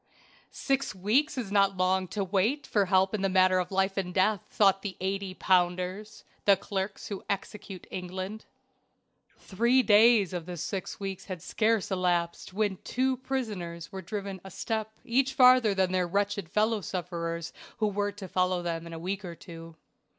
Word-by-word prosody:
Six 275 -6 -1
weeks 235 +12 +1
is 225 -6 -3
not 195 -1 +3
long 185 +1 +1
to 200 +2 -2
wait 205 +10 0
for 205 -2 +2
help 190 +1 +3
in 205 -2 -1
a 195 - +2
matter 185 0 +4
of 180 - -3
life 195 0 +1
and 185 -2 -1
death, 190 +2 +2
thought 195 -2 +3
the 195 -2 -5
eighty 195 0 -3
pounders, 185 +3 0 0.2
the 200 -1 +6
clerks 195 0 -4
who 200 -2 -5
execute 195 -1 -5
England. 185 +3 -5 0.9
Three 235 +6 +2
days 215 -3 +5
of 175 -2 -4
this 175 -3 -5
six 195 -2 -4
weeks 195 -2 -5
had 185 -2 -6
scarce 220 -2 +1
elapsed 175 -2 0
when 205 -1 0
two 260 +5 -1
prisoners 210 -11 -4
were 190 - -6
driven 195 0 -5
a 190 - -9
step 220 +3 -3 0.2
each 265 +3 +1
farther 250 -6 +6
than 190 -1 +2
their 185 -1 +1
wretched 200 -1 -1
fellow 215 +2 +1
sufferers 170 -2 -4 0.2
who 215 - +1
were 205 0 -1
to 200 -1 -9
follow 185 0 0
them 170 -1 -3
in 165 - -8
a - - -5
week 190 +5 -4
or 175 -2 -7
two. 165 -2 -11
195 Hz, 170 wpm, -28 LUFS, 180-210 Hz, 0.9 s, the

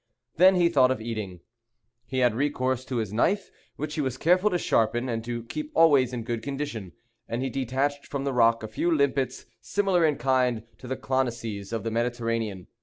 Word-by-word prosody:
Then 185 +3 +7
he 175 -1 +4
thought 130 -6 +4
of 130 - 0
eating. 110 -6 -5 0.7
He 130 - -4
had 120 - +3
recourse 130 -1 0
to 130 - -4
his 110 -4 -2
knife, 195 - +1 0.2
which 150 +1 -4
he 155 - -1
was 130 -2 -2
careful 180 +7 +3
to 180 - 0
sharpen, 120 -4 +1
and 115 -2 -2
to 120 -1 -4
keep 300 - -6
always 140 -6 +5
in 120 -2 -4
good 115 0 -3
condition; 135 - -5 0.4
and 120 +3 -2
he 135 - -2
detached 135 +3 -1
from 140 -1 -3
the 140 -1 -1
rock 115 -2 +3
a - - -3
few 110 +10 -1
limpets, 140 -4 0 0.2
similar 195 -4 +1
in 155 -2 +3
kind 125 -5 +1 0.2
to 125 - -10
the 130 +1 -3
clonisses 115 -6 -2
of 115 - -3
the 115 - -2
Mediterranean. 115 -4 -2
130 Hz, 195 wpm, -26 LUFS, 115-145 Hz, 0.7 s, Then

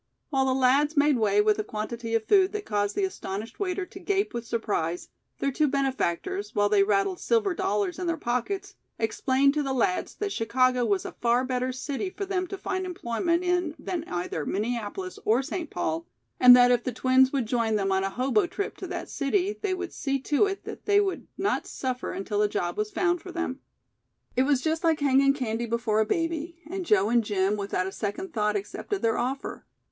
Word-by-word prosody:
While 270 -2 +2
the 260 - +2
lads 275 +4 +3
made 290 0 +5
away 210 -2 +3
with 215 0 +2
a - - 0
quantity 225 +2 -4
of 225 -1 0
food 385 -1 +4
that 420 -1 -4
caused 205 -1 -1
the 400 - 0
astonished 225 - -4
waiter 385 -1 -1
to - - -11
gape 400 0 0
with 235 -1 -5
surprise, 180 -7 -2 0.3
their 275 - 0
two 300 +3 +2
benefactors, 275 - -1
while 205 0 +3
they 205 -1 +4
rattled 200 - +1
silver 435 -5 +1
dollars 205 - -1
in 360 - -2
their 335 -1 0
pockets, 250 +11 -2 0.2
explained 260 +5 +2
to 300 - 0
the 270 -2 -1
lads 365 +7 0
that 415 -1 -3
Chicago 255 - +2
was 200 -4 0
a - - -4
far 240 +1 +1
better 255 0 -1
city 275 +8 -3
for 395 +1 -5
them 370 -1 -1
to 390 - -6
find 375 -1 -3
employment 340 +2 -1
in 355 -3 0
than 350 -4 -4
either 175 -3 -3
Minneapolis 235 - -3
or 235 +5 +3
St. 320 +2 -4
Paul, 165 -1 -2 0.3
and 250 0 +10
that 245 0 +6
if 245 -1 +2
the 255 - -2
twins 260 +2 +4
would 270 -4 0
join 225 -1 0
them 195 -2 0
on 190 0 +2
a 195 - 0
hobo 265 - +1
trip 395 +3 -4
to - - -6
that - - -5
city 365 +8 -1
they 390 -3 0
would 370 -1 -5
see 275 -1 -1
to 295 +9 +2
it 395 0 -4
that - - -8
they 405 0 +5
would 395 -2 -1
not 400 - 0
suffer 255 -1 -3
until 205 +1 -2
a 210 - +3
job 175 -3 -2
was 210 0 -1
found 350 - 0
for 365 - -9
them. 340 -6 -3 0.8
It 255 +2 +3
was 280 -3 +3
just 320 +3 -1
like 325 -2 +3
hanging 275 -1 +4
candy 235 -3 -2
before 225 -2 0
a 220 - +2
baby, 330 +3 -2
and 370 +1 -5
Joe 205 0 +4
and 235 0 +3
Jim 200 -1 +1
without 200 -3 -2
a 190 - -4
second 305 - -4
thought 210 -1 +1
accepted 205 - -4
their 225 -1 +2
offer. 260 +3 -3
260 Hz, 210 wpm, -27 LUFS, 215-345 Hz, 0.8 s, and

